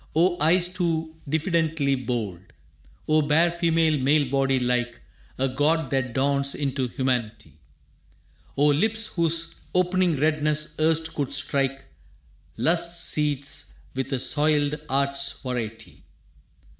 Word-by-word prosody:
O 175 +1 +2
eyes 175 +3 +4
too 165 -3 -2
diffidently 160 -2 0
bold! 120 -8 -3 0.7
O 155 0 +4
bare 155 +4 +3
female 165 -3 +1
male 140 0 +2
body 135 -1 +2
like 125 -1 -1 0.4
A 135 - +1
god 145 +2 0
that 130 -3 -1
dawns 140 +1 0
into 135 -2 -1
humanity! 115 - -3 1.0
O 145 - +3
lips 215 +10 +2
whose 165 -1 0 0.2
opening 180 -1 +2
redness 150 +1 0
erst 160 +1 +1
could 140 -3 -3
strike 140 -1 -1 0.7
Lust's 170 +1 +1
seats 145 -2 -1 0.2
with 130 0 -4
a 135 - +1
soiled 145 +2 +2 0.2
art's 140 +1 +1
variety! 115 -3 -6
145 Hz, 115 wpm, -24 LUFS, 135-160 Hz, 1.0 s, eyes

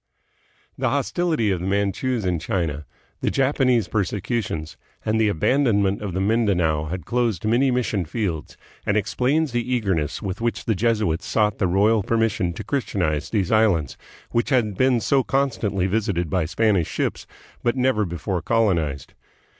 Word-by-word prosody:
The - - +1
hostility 160 - 0
of 90 - 0
the 90 - -4
Manchus 100 +4 0
in 90 -2 0
China, 80 -6 -2 0.3
the - - 0
Japanese 130 -4 +2
per 105 -3 +1
secutions, 95 -6 -3 0.3
and 110 +1 +1
the 110 - +4
abandonment 100 - +2
of 100 -4 -4
Mindanao 95 -7 +1
had 85 0 -5
closed 115 -5 0
many 120 +5 +3
mission 120 -7 0
fields, 85 -4 -3 0.3
and 105 - +1
explains 130 +8 +1
the 120 +1 -2
eagerness 95 -10 -1
with 100 -1 -5
which 120 0 -2
the 110 - +2
Jesuits 105 -6 0
sought 105 -2 +1
the 95 - +2
royal 105 +5 +3
permission 110 -4 0
to - - -7
Christianize 90 - -1
these 100 -6 0
islands, 100 - +2 0.4
which 120 - 0
had 115 -7 +1
been 130 +2 +3
so 135 +2 +2
constantly 115 -9 0
visited 95 -5 -1
by 90 -4 +1
Spanish 100 -1 +1
ships - - -3 0.3
but 120 +1 +1
never 125 -4 +2
before 85 0 -3
colonized. 85 -11 0
105 Hz, 155 wpm, -23 LUFS, 90-120 Hz, 0.4 s, the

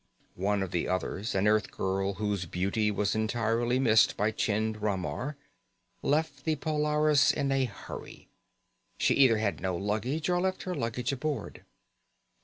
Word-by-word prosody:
One 100 +1 +1
of 95 - -5
the 85 - -1
others, 95 +3 -2
an 95 +1 +2
Earthgirl 95 -2 0
whose 100 -3 -2
beauty 100 +5 0
was 105 0 0
entirely 115 +2 0
missed 115 -4 +4
by 105 +2 +1
Chind 110 0 -1
Ramar, 105 - -2 0.6
left 145 -1 0
the 160 - +1
Polaris 150 -1 +3
in 140 -2 -1
a 135 -1 +2
hurry. 105 -5 -9 0.7
She - - +3
either 130 -5 +5
had 105 -2 -1
no 95 -1 -1
luggage 110 - -1
or 175 -1 +2
left 185 0 -1
her 185 - -3
luggage 120 -1 -2
aboard. 140 -4 -4
110 Hz, 145 wpm, -29 LUFS, 100-140 Hz, 0.7 s, either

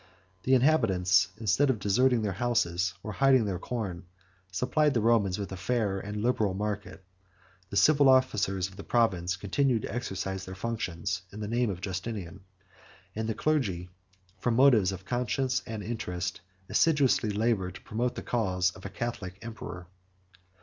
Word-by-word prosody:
The 130 - +5
inhabitants, 95 -10 +3
instead 115 +6 +2
of 130 - +2
deserting 120 +4 +2
their 105 - 0
houses, 90 -7 +1
or 105 - -4
hiding 135 -1 +4
their 95 -3 -2
corn, 95 -6 -4 0.4
supplied 140 +9 +1
the - - +3
Romans 110 -4 +2
with 100 -2 -5
a - - -4
fair 100 0 -1
and 105 +2 -5
liberal 110 -6 +1
market: 100 -2 -4 0.7
the 100 - -3
civil 145 +4 +5
officers 100 -7 +2
of 95 0 -15
the - - -7
province 95 -7 +1
continued 110 +5 0
to - - -5
exercise 95 -5 -3
their 95 0 -8
functions 95 -4 -3
in 105 - -9
the 105 - -4
name 120 +1 +1
of 90 -2 -5
Justinian: 95 -1 -5 0.8
and 110 +1 -2
the 110 - -1
clergy, 100 - 0 0.5
from 120 +3 0
motives 115 -7 +5
of 95 0 -8
conscience 130 +2 0
and 110 -2 -5
interest, 95 -6 -4 0.3
assiduously 140 -8 +3
labored 105 -3 0
to 95 - -10
promote 120 +3 -2
the - - -6
cause 95 -6 +1
of 95 - -14
a - - -8
Catholic 100 -4 -5
emperor. 110 -6 -7
105 Hz, 160 wpm, -29 LUFS, 95-120 Hz, 0.8 s, The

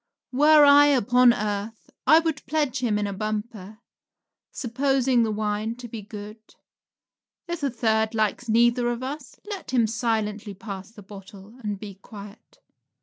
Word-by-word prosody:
Were 295 +3 +6
I 285 0 +7
upon 250 -2 +4
earth 210 0 -4 0.2
I 315 - +8
would 325 -2 -1
pledge 290 -4 -1
him 230 -5 0
in 210 - -1
a 200 - -3
bumper, 215 0 -5 0.7
supposing 265 0 +1
the 225 - +1
wine 215 +1 -2
to 245 0 -9
be 225 -1 -7
good. 210 +1 -10 1.1
If 345 -1 -4
a 280 - 0
third 220 -2 0
likes 220 +2 -1
neither 240 +2 +3
of 240 +1 -4
us, 275 +1 -7
let 400 -4 -7
him 245 -3 +2
silently 220 -2 -2
pass 195 -2 -8
the 215 -2 -14
bottle 195 +1 -13
and 205 -1 -3
be 205 -1 -8
quiet. 205 0 -13
225 Hz, 150 wpm, -24 LUFS, 210-255 Hz, 1.1 s, I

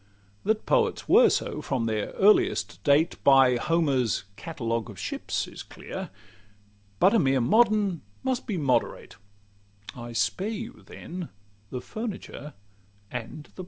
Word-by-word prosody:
That 215 +1 0
poets 460 -2 +1
were 475 -1 +7
so - - -2
from 130 -4 -1
their 110 -2 -1
earliest 105 - +3
date, 150 +4 +2
By 135 -2 +6
Homer's 140 -7 +1
"Catalogue 115 -4 -3
of 105 - -10
ships" - - -3
is - - -9
clear; - - -8 0.9
But 195 - +5
a 230 - +5
mere 135 -4 +2
modern 205 - +3 0.2
must 260 -1 -1
be 205 -6 -2
moderate 135 -5 -1 0.8
I 120 -1 -8
spare 185 - 0
you 225 +2 -6
then 175 -1 -8 0.4
the 125 +1 -5
furniture 200 - -7 0.6
and 125 +5 -6
plate. - - -18
150 Hz, 130 wpm, -26 LUFS, -, 0.9 s, were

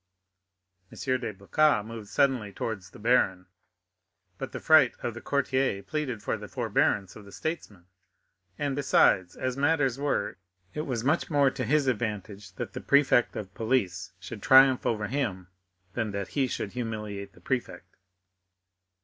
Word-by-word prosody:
M. - - -12 0.2
de 115 -3 -4
Blacas 105 +4 +2
moved 115 -2 -8
suddenly 130 -7 +1
towards 95 -3 -5
the - - -14
baron, 105 -5 +2 0.9
but 135 - -5
the - - -5
fright 155 -6 +5
of 120 - -2
the 120 - -9
courtier 130 -7 0
pleaded 130 -2 -3
for - - -1
the - - -9
forbearance 100 -3 0
of 105 - -11
the 100 - -14
statesman; 110 - -5 0.7
and 145 -2 -1
besides, 95 -9 +3
as 130 -1 -2
matters 140 -3 +1
were, 120 -9 -1 0.4
it 150 - -4
was 120 -4 -2
much 145 +6 +1
more 140 -3 +3
to 130 0 -4
his 140 +5 +2
advantage 105 -5 -3
that - - -6
the - - -6
prefect 140 -4 +3
of 100 -2 -6
police 110 -7 -1
should - - -8
triumph 130 -1 +6
over 105 -2 0
him 105 -7 -3 0.4
than 110 -2 -1
that 100 -1 -4
he 135 -2 0
should 105 - -4
humiliate 105 -4 -5
the - - -18
prefect. 130 -2 -4
120 Hz, 155 wpm, -28 LUFS, 100-135 Hz, 0.9 s, triumph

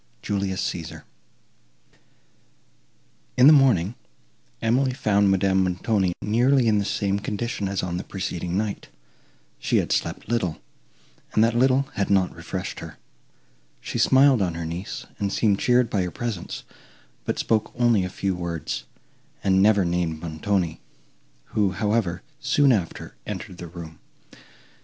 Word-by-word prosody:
JULIUS 100 -2 -1
CÆSAR 85 -3 -6 2.3
In 125 - +7
the 150 - +10
morning, 120 - +4 0.7
Emily 130 +3 +2
found 100 -4 +2
Madame 95 0 +3
Montoni 95 +1 0
nearly 120 +4 +3
in 105 -2 +3
the 100 - -1
same 100 -1 0
condition, 105 0 -3
as 100 -1 -2
on 90 -1 -2
the 90 - -4
preceding 90 -2 -3
night; 105 -1 -3 0.7
she - - +1
had - - 0
slept - - -1
little, 100 -8 -1 0.8
and 110 - +4
that 115 0 +2
little 130 +2 +4
had 100 -4 -1
not 95 -2 +2
refreshed - - -5
her; - - -9 0.8
she - - -4
smiled 135 -3 +5
on 90 -3 0
her 85 -1 -4
niece, 95 +8 -5
and 100 -1 -1
seemed 100 -2 +2
cheered 125 -1 +3
by 100 - 0
her 90 - -1
presence, 110 -2 -5 0.6
but - - -2
spoke 110 -1 0
only 120 -5 +3
a 90 - -3
few 95 +1 -2
words, 85 -8 -4 0.6
and 95 -1 +3
never 100 -2 +4
named 85 -2 -1
Montoni, 85 +1 -2 0.7
who, 100 -3 +2
however, 100 -3 0 0.2
soon 145 -2 +3
after, 95 -9 -2
entered 100 -2 -6
the 85 - -6
room. 80 -1 -10
100 Hz, 140 wpm, -24 LUFS, 90-115 Hz, 2.3 s, the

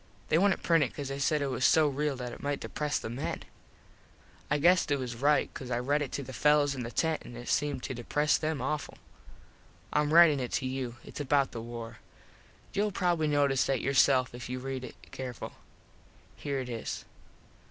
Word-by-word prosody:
They 155 - +4
wouldnt 195 0 +2
print 165 -3 +4
it 130 - -4
cause 140 -2 -4
they 135 0 -4
said 150 +1 +1
it 140 - -1
was 125 - -2
so 155 +1 +5
real 145 0 -1
that 125 -2 -5
it - - -10
might 145 0 -1
depres 150 -1 -2
the - - -6
men. 120 +4 -4 1.1
I 150 - +2
guess 175 +5 +5
they 145 - 0
was 125 -3 -4
right 145 +5 +2
cause 130 -3 -7
I 120 - 0
read 140 +5 +1
it 145 - -3
to 140 - -2
the 130 - -9
fellos 150 0 +3
in 130 - -5
the 115 - -4
tent 160 +5 0
an 120 - -10
it 120 +1 -8
seemed 145 -3 0
to - - -3
depres 145 +5 +1
them 155 -4 -2
awful. 150 +2 -3 1.0
Im 150 0 +3
ritin 160 -3 +7
it 125 -2 -4
to 130 - 0
you. 130 -2 -3
Its - - -9
about 140 -1 +2
the 115 - -6
war. 115 0 -7 0.7
Youll 205 +1 +1
probably 175 -4 +1
notice 145 -3 +3
that 135 -2 +1
yourself 130 -1 +3
if 120 -1 -7
you 125 - -3
read 130 0 -4
it - - -8 0.2
careful. 125 -3 -6 0.8
Here 140 -2 -3
it 125 -1 -5
is. 115 -2 -5
140 Hz, 205 wpm, -30 LUFS, 125-150 Hz, 1.1 s, ritin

